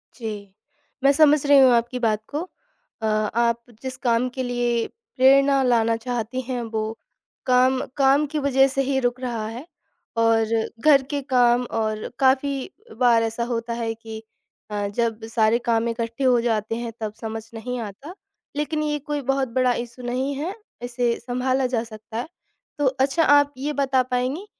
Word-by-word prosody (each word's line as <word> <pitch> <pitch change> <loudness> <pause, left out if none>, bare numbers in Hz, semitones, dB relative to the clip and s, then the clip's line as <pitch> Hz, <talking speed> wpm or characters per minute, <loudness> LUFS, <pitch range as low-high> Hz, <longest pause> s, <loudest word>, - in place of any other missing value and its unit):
जी, 210 -5 -7 0.5
मैं 275 - +6
समझ 295 -1 +4
रही 285 -1 +7
हूँ 260 -2 +7
आपकी 240 +2 0
बात 215 -2 +1
को। 295 +3 -3 0.6
अ, - - -2
आप 225 +2 +1 0.2
जिस 260 -1 -5
काम 240 +1 +2
के 260 - -1
लिए 240 -1 0 0.3
प्रेरणा 275 +1 +5
लाना 230 -2 +3
चाहती 245 +1 -3
हैं 250 -1 -4
वो 220 0 0 0.6
काम 255 +1 +4 0.2
काम 275 +2 +4
की 300 - 0
वज़ह 270 -1 +4
से 275 0 -1
ही 270 0 0
रुक 245 0 -1
रहा 235 -4 -3
है। 240 +7 -7 0.5
और 225 -1 +3 0.4
घर 280 -3 +7
के 285 -1 -1
काम 245 -1 +4
और 215 -1 -1
काफ़ी 270 +2 +2 0.3
बार 235 -2 +4
ऐसा 225 +1 -2
होता 230 0 -2
है 230 -1 -2
कि 220 -1 -9 0.5
अ, 205 -1 -1
जब 225 +1 -2
सारे 225 0 +2
काम 230 -1 0
इकट्ठे 230 +3 -3
हो 250 -2 +4
जाते 225 -1 -1
हैं 235 0 -4
तब 215 -1 -4
समझ 225 0 -4
नहीं 245 +2 -5
आता, 230 - -8 0.4
लेकिन 305 +1 -1
ये 295 -1 -1
कोई 295 0 -3
बहुत 270 -1 0
बड़ा 250 -1 +3
इश्यू 240 +1 -6
नहीं 260 +3 -1
है 325 +8 -3 0.3
इसे 245 -1 0
सँभाला 255 +2 -1
जा 230 -1 +1
सकता 220 0 -9
है। 245 - -3 0.5
तो 290 - 0
अच्छा 270 +5 +1
आप 290 -1 +4
ये 295 +3 -3
बता 265 -2 +2
पाएँगी 265 +10 -2
245 Hz, 170 wpm, -23 LUFS, 230-270 Hz, 0.6 s, रही